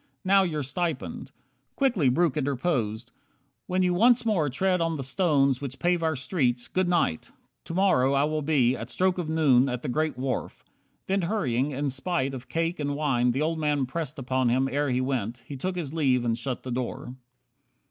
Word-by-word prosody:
Now 195 +1 +5
your 155 -6 -1
stipend 140 - -3 0.2
" 130 +1 -46
Quickly 230 - +2
Breuck 155 +2 +2
interposed. 125 -5 -1 0.6
"When 185 0 +1
you 180 -1 +2
once 235 +6 +4
more 180 -10 +1
Tread 180 +7 +1
on 165 -1 0
the 140 - -4
stones 140 -3 +2
which 135 -2 -5
pave 175 -1 +1
our 160 -1 0
streets. 130 -3 -1
Good 185 -1 0
night! 165 - 0 0.4
To 165 - -6
morrow 140 -9 +3
I 140 0 +3
will 155 +1 -1
be, 135 -5 +2
at 115 -1 -7
stroke 185 +3 0
of 165 -3 -3
noon, 140 -5 +4
At 125 -1 -4
the - - -3
great 155 +2 -1
wharf." 130 -2 -3 0.4
Then 195 +1 0
hurrying, 145 - 0
in 140 0 -2
spite 135 0 -2
Of 125 -1 -8
cake 165 +2 -1
and 145 -1 -1
wine 135 -5 +1
the 135 +5 0
old 160 +1 -1
man 145 -3 +1
pressed 150 +2 -5
upon 130 -1 0
Him 130 +3 +2
ere 145 0 0
he 125 0 +1
went, 120 -3 -2
he 140 - -7
took 185 +8 -3
his 160 -5 -4
leave 130 -6 +2
and 115 -1 +1
shut 125 +1 -4
the 130 - -5
door. 125 0 -4
140 Hz, 200 wpm, -26 LUFS, 125-170 Hz, 0.6 s, Now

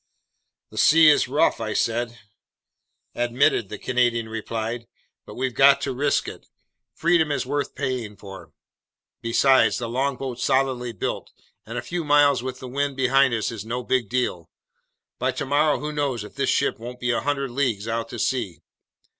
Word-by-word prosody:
"The - - -5
sea 160 0 +7
is 150 - +4
rough," 150 +5 +2
I 110 -1 -2
said. 120 +1 -1 1.0
"Admitted," 120 -2 +1
the 105 - -6
Canadian 120 -1 0
replied, 115 +1 -4 0.4
"but - - -10
we've 130 -1 -2
got 140 +1 +6
to 135 - -2
risk 140 +3 0
it. - - -9 0.5
Freedom 165 -2 +2
is 140 - -1
worth 145 +2 -3
paying 115 -6 -3
for. 95 -1 -11 0.7
Besides, 130 +3 +3
the 120 - -4
longboat's 130 0 -2
solidly 130 -3 +1
built, 105 - -4 0.4
and - - -6
a - - -3
few 175 -1 -3
miles 145 -3 +4
with 130 0 -6
the 130 - -8
wind 140 +2 -2
behind 135 0 +3
us 110 - -2
is 110 -3 -6
no 120 +3 -4
big 125 -5 0
deal. 125 -9 -2 0.7
By - - +1
tomorrow, 145 +2 +1
who 150 +1 -4
knows 140 -7 -2
if 105 - -11
this 140 -1 -1
ship 140 - +1
won't 125 +2 -8
be 125 -1 0
100 140 0 -1
leagues 120 -5 -1
out 115 0 -2
to 120 - -7
sea? 105 - -2
125 Hz, 165 wpm, -24 LUFS, 115-140 Hz, 1.0 s, sea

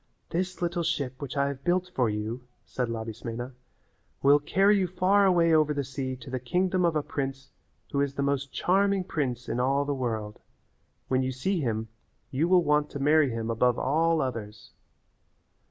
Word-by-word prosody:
"This 180 +1 -2
little 175 0 0
ship 140 -6 -2
which 140 0 -5
I 140 0 +2
have 140 -1 -7
built 180 +1 0
for 125 -3 +2
you," 110 +4 -3 0.2
said 125 -2 -3
Labismena, 115 +2 -5 0.7
"will 140 +1 +6
carry 195 +7 +3
you 185 - +1
far 190 +3 +3
away 170 -3 +4
over 155 -1 +3
the 140 - -1
sea 130 0 -4
to 130 +1 -11
the 130 - -2
kingdom 180 +8 +1
of 170 -2 +1
a 150 - +1
prince 135 -2 -4 0.4
who 140 - +1
is 140 -1 -1
the 140 - -1
most 140 -1 -1
charming 195 +1 +2
prince 130 -9 -3
in - - -2
all 135 +3 +2
the 145 - -1
world. 110 -5 -3 0.7
When 130 0 +1
you 130 0 -1
see 175 +9 -1
him 110 -4 -2 0.4
you 145 +6 +1
will 180 -1 +5
want 150 -1 +2
to 145 - -6
marry 150 0 +4
him 115 -1 -3
above 120 +1 +2
all 160 +4 +2
others." 115 -5 -5
140 Hz, 185 wpm, -27 LUFS, 125-170 Hz, 0.7 s, will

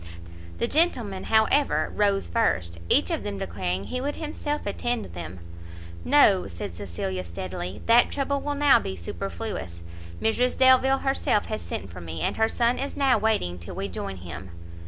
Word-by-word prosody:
The 235 - 0
gentlemen, 240 - +1
however, 220 +6 +3
rose 200 -1 +2
first, 85 - 0
each - - +4
of - - -1
them 100 -1 -4
declaring 90 +1 -2
he 250 - -4
would 290 +2 -2
himself 300 -1 -4
attend 240 +3 -2
them. 85 +1 -7 0.6
"No," 215 -10 +5
said 85 -1 -7
Cecilia, 95 0 -4
steadily, 90 +2 -6
"that 235 +1 +5
trouble 280 0 -1
will 290 0 -2
now 285 -1 +5
be 95 - -5
superfluous; 85 -1 -6 0.4
Mrs 245 +3 +1
Delvile 260 +1 +5
herself 270 -6 +1
has 215 - -4
sent 95 - -6
for 90 - -9
me, 80 -1 -6
and - - -1
her 220 0 +3
son 240 0 +1
is 275 - -4
now 270 -5 +3
waiting 205 - 0
till 85 - -9
we 100 - -3
join 95 +1 -5
him." 90 +1 -8
200 Hz, 165 wpm, -26 LUFS, -, 0.6 s, No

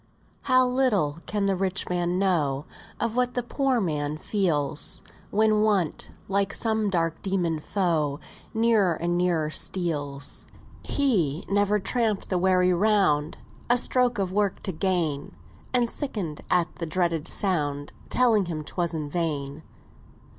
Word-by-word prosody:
"How 255 0 +6
little 225 - +1
can 205 -1 0
the 195 -1 +2
rich 190 0 -2
man 175 0 0
know 150 -8 +1 0.3
Of 230 -1 -1
what 250 0 +1
the 245 - 0
poor 265 +1 +1
man 150 -5 -1
feels, 155 -7 -1 0.3
When 215 0 +3
Want, 200 -7 +1 0.2
like 200 0 0
some 220 -2 0
dark 165 -3 -1
dæmon 175 -5 -1
foe, 155 -7 0 0.3
Nearer 220 -6 +3
and 175 +2 -1
nearer 170 -4 +1
steals! 145 -6 -2 0.3
He 185 - +1
never 205 +1 +2
tramp'd 220 0 0
the 185 - +1
weary 185 0 +3
round, 180 -6 +2 0.3
A 245 - +5
stroke 250 -1 +2
of 190 -2 -1
work 205 -1 0
to 195 - -1
gain, 165 -5 -1 0.4
And 245 -2 +2
sicken'd 205 - -4
at 175 -1 +1
the 170 - -4
dreaded 170 -1 0
sound 145 -7 -1 0.2
Telling 230 -6 +3
him 155 -3 -4
'twas 170 +2 -2
in 155 -2 -3
vain. 145 -2 -2
185 Hz, 140 wpm, -26 LUFS, 155-210 Hz, 0.4 s, How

